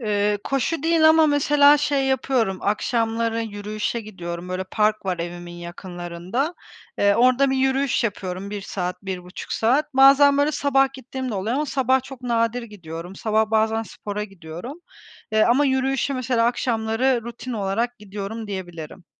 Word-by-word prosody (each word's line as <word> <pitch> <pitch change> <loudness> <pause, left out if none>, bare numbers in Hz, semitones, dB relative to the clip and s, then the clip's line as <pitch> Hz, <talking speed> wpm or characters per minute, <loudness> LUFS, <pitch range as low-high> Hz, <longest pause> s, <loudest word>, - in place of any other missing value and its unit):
Eee, 205 -2 +1
koşu 275 +3 -1
değil 325 -1 +5
ama 320 0 +6
mesela 290 0 +5
şey 280 -2 +1
yapıyorum, 255 -7 0
akşamları 230 +2 0
yürüyüşe 215 +2 -3
gidiyorum, 175 -4 -7
böyle 185 +1 -3
park 210 +1 0
var 180 -2 -1
evimin 175 0 -6
yakınlarında. 175 - -5 0.4
Eee, 200 0 +4
orada 255 +4 +4
bir 265 - +1
yürüyüş 265 -2 +1
yapıyorum 190 -2 -4
1 205 -1 -4
saat, 180 -1 -4
1,5 180 -1 -6
saat. 270 +6 +1
Bazen 275 +1 +7
böyle 290 +2 +2
sabah 270 -1 +2
gittiğim 260 -1 -6
de - - -3
oluyor 205 +5 -1
ama 300 - 0
sabah 265 -1 +1
çok 265 -1 -11
nadir 235 0 0
gidiyorum, 175 -4 -9
sabah 220 +1 +1
bazen 220 0 +2
spora 210 -1 -5
gidiyorum, 195 - -9 0.5
eee, 215 0 +4
ama 260 +5 +3
yürüyüşe 270 +1 0
mesela 250 -2 +1
akşamları 240 +1 +1
rutin 240 +1 -7
olarak 225 +4 -1
gidiyorum 210 +2 -6
diyebilirim. 175 -3 -7
225 Hz, 150 wpm, -23 LUFS, 195-265 Hz, 0.5 s, Bazen